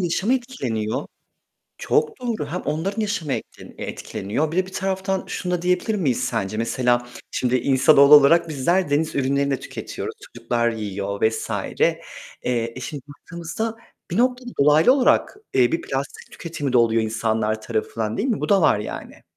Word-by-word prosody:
yaşamı 185 +7 +1
etkileniyor 130 - -3 0.7
çok 155 0 0
doğru 230 -10 -2
hem 175 +5 -4
onların 195 +8 -2
yaşamı 205 -9 -1
et - - -2 0.3
etkileniyor. 140 +11 -3
Bir 170 - -3
de 185 - +2
bir 190 - -12
taraftan 190 0 -1
şunu 180 -1 -3
da 175 - -1
diyebilir 180 +5 +1
miyiz 145 - 0
sence? 110 -4 -2
Mesela 120 +1 +1 0.2
şimdi 125 0 0
insanoğlu 140 +2 +5
olarak 160 +4 +5
bizler 170 +5 +1
deniz 150 +2 0
ürünlerini 140 +1 +1
de 135 - 0
tüketiyoruz. - - -6
Çocuklar 120 -1 -1
yiyor 100 -3 -4
vs. 110 0 0 0.3
Eee, - - +2 0.4
eee, 115 -2 -1
şimdi 145 0 -6
baktığımızda 170 +8 -5 0.4
bir 175 - -1
noktada 250 +1 +1
dolaylı 150 - +6
olarak, 270 +6 +2 0.2
eee, 125 -2 +4
bir 165 - 0
plastik 135 +1 -5
tüketimi 145 -6 -4
de - - +5
oluyor 115 -1 +3
insanlar 110 -1 -1
tarafından 110 0 -3
değil 225 - 0
mi? 225 - -1
Bu - - -2
da 200 -2 +5
var 130 - +4
yani. 105 - -7
145 Hz, 160 wpm, -22 LUFS, 120-185 Hz, 0.7 s, dolaylı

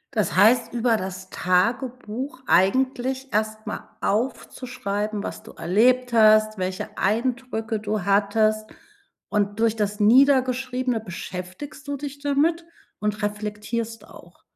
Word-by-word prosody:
Das - - 0
heißt, 230 +4 +4
über 235 -1 +2
das 190 -2 -6
Tagebuch 240 +7 -1
eigentlich 260 +6 +1
erst 215 +1 -1
mal - - -6
aufzuschreiben, 215 -2 -2
was - - -6
du - - -13
erlebt 240 +9 +2
hast, 215 -1 +5
welche 185 0 -4
Eindrücke 225 0 -1
du 210 0 -2
hattest. 215 +2 +2 0.6
Und 205 0 -1
durch 225 -1 +2
das 210 -1 -2
Niedergeschriebene 255 +1 +3
beschäftigst 185 - -8
du 285 0 -3
dich 285 0 -7
damit 295 +4 +1 0.4
und 210 0 -2
reflektierst 215 +2 -4
auch. - - -16
220 Hz, 115 wpm, -24 LUFS, 210-255 Hz, 0.6 s, hast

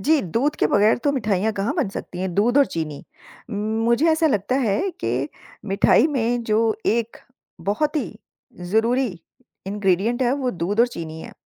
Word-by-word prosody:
जी, 310 0 +3
दूध 235 - -1
के - - +2
बगैर 210 +2 +3
तो 285 - +3
मिठाइयाँ 220 -4 0
कहाँ 210 +8 -2
बन 295 - 0
सकती 185 -2 -7
हैं, 185 -2 -3
दूध 240 +8 +3
और 280 - +5
चीनी। 155 -3 -5 0.5
मुझे 225 +6 +1
ऐसा 320 +1 +2
लगता 210 -3 0
है 215 -1 +1 0.2
कि 125 +5 -1 0.4
मिठाई 195 +9 +4
में 245 -4 0
जो 220 0 +1
एक 230 0 0 0.5
बहुत 300 +9 0
ही - - -3 0.4
ज़रूरी 230 +8 +1 0.6
इन्ग्रेडिएंट 205 +4 0
है 245 0 +2
वो 265 -3 -1
दूध 195 +3 -1
और 240 - +6
चीनी 160 -8 -7
है। - - -10
220 Hz, 170 wpm, -22 LUFS, 195-250 Hz, 0.6 s, और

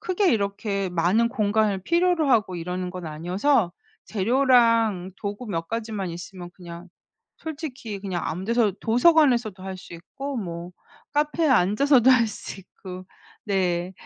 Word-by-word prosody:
크게 370 -1 +1
이렇게 200 -2 -1
많은 180 +7 +2
공간을 210 -3 0
필요로 340 - +2
하고 205 -6 +2
이러는 180 +2 -4
건 180 -2 -7
아니어서 180 - 0 0.3
재료랑 230 -4 +2
도구 205 +4 -5
몇 165 -5 -4
가지만 215 -5 -3
있으면 175 +1 -9
그냥 175 0 -10 0.5
솔직히 280 -10 -6
그냥 185 -3 -3
아무 180 +4 -4
데서 230 -1 +2
도서관에서도 240 - +3
할 190 0 -5
수 180 - -12
있고 275 +10 -7
뭐 175 -3 -6 0.4
카페에 300 +2 +1
앉아서도 245 +5 +4
할 235 -2 +4
수 205 -2 -8
있고. 185 0 -11 0.4
네 180 -3 0
205 Hz, 295 characters per minute, -24 LUFS, 180-245 Hz, 0.5 s, 앉아서도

